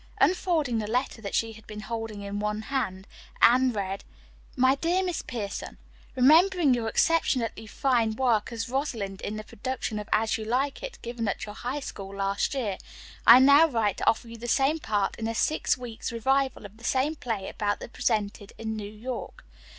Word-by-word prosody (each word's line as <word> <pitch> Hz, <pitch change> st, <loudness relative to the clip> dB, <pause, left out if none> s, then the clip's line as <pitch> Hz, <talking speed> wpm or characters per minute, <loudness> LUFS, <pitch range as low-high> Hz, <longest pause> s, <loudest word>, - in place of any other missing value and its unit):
Unfolding 320 Hz, -10 st, +2 dB
the 210 Hz, -, -3 dB
letter 245 Hz, -1 st, -1 dB
that 200 Hz, -, -4 dB
she 225 Hz, 0 st, +1 dB
had 220 Hz, 0 st, -15 dB
been 210 Hz, 0 st, -7 dB
holding 225 Hz, -2 st, -5 dB
in 200 Hz, 0 st, -4 dB
one 210 Hz, +1 st, -2 dB
hand, 195 Hz, -8 st, -2 dB, 0.3 s
Anne 255 Hz, +2 st, +6 dB
read: 195 Hz, -3 st, -3 dB, 0.5 s
"MY 260 Hz, +1 st, +4 dB
DEAR 340 Hz, +6 st, +1 dB
MISS 360 Hz, -3 st, -2 dB
PIERSON: 210 Hz, -5 st, -5 dB, 0.4 s
"Remembering 315 Hz, +3 st, +5 dB
your 235 Hz, -2 st, -1 dB
exceptionally 235 Hz, -6 st, +1 dB
fine 230 Hz, -2 st, +1 dB
work 235 Hz, -4 st, +1 dB
as 230 Hz, 0 st, -3 dB
'Rosalind' 235 Hz, -7 st, -3 dB
in 215 Hz, -, -4 dB
the 215 Hz, -, -5 dB
production 220 Hz, 0 st, -4 dB
of 210 Hz, -, -8 dB
'As 220 Hz, +1 st, +2 dB
You -, -, -4 dB
Like 265 Hz, -, 0 dB
It,' -, -, -6 dB
given 235 Hz, -1 st, -3 dB
at 200 Hz, -, -2 dB
your 210 Hz, -, -8 dB
High 255 Hz, +6 st, -4 dB
School 195 Hz, -6 st, -7 dB
last 195 Hz, +6 st, -1 dB
year, 210 Hz, -8 st, -2 dB, 0.5 s
I 235 Hz, -, +11 dB
now 280 Hz, +5 st, +7 dB
write 225 Hz, -, 0 dB
to -, -, -4 dB
offer 225 Hz, +1 st, -1 dB
you 230 Hz, 0 st, -9 dB
the 240 Hz, +2 st, -7 dB
same 275 Hz, +6 st, +2 dB
part 205 Hz, -7 st, -1 dB
in 225 Hz, -, -2 dB
a 230 Hz, -, -3 dB
six 305 Hz, +2 st, +1 dB
weeks' 245 Hz, -1 st, -6 dB
revival 265 Hz, +1 st, 0 dB
of 205 Hz, +2 st, -12 dB
the 230 Hz, -, -17 dB
same 265 Hz, +5 st, +1 dB
play 225 Hz, -9 st, -4 dB
about 205 Hz, -1 st, -2 dB
to -, -, -7 dB
be -, -, -23 dB
presented 205 Hz, -2 st, -1 dB
in 220 Hz, -1 st, -4 dB
New 205 Hz, -1 st, -6 dB
York. 240 Hz, +4 st, -7 dB
230 Hz, 195 wpm, -27 LUFS, 210-265 Hz, 0.5 s, I